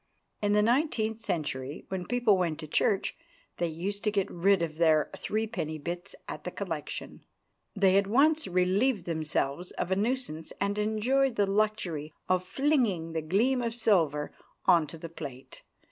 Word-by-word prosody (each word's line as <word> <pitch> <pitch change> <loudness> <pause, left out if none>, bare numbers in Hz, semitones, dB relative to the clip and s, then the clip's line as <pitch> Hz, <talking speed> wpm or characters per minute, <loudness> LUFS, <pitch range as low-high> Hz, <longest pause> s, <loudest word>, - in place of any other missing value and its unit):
In 205 0 +2
the 210 0 +4
nineteenth 230 -3 +1
century, 145 -8 -3
when 185 -2 -4
people 245 -4 +3
went 170 -4 -1
to 155 - -7
church, 195 +6 +1 0.4
they 175 - 0
used 190 +6 -4
to 210 - +2
get 200 -2 0
rid 185 +1 +3
of 155 -2 -4
their 160 -3 +3
threepenny 215 -8 -2
bits 175 +4 -5
at - - -6
the - - -3
collection. - - -5 0.5
They 195 -2 +4
at 200 - -1
once 300 +8 +3
relieved 185 +4 +2
themselves 160 0 -1
of 180 - -3
a - - +4
nuisance, 210 -7 -2
and 200 +1 0
enjoyed 230 +5 +1
the 205 - +3
luxury 195 -7 -1
of 185 0 +2
flinging 220 - +1
the 160 - -1
gleam 225 +11 +2
of 230 -1 -2
silver 165 -11 +2 0.3
on 170 -4 +5
to 155 - -8
the 165 - -7
plate. 140 -6 -9
190 Hz, 160 wpm, -29 LUFS, 165-220 Hz, 0.5 s, on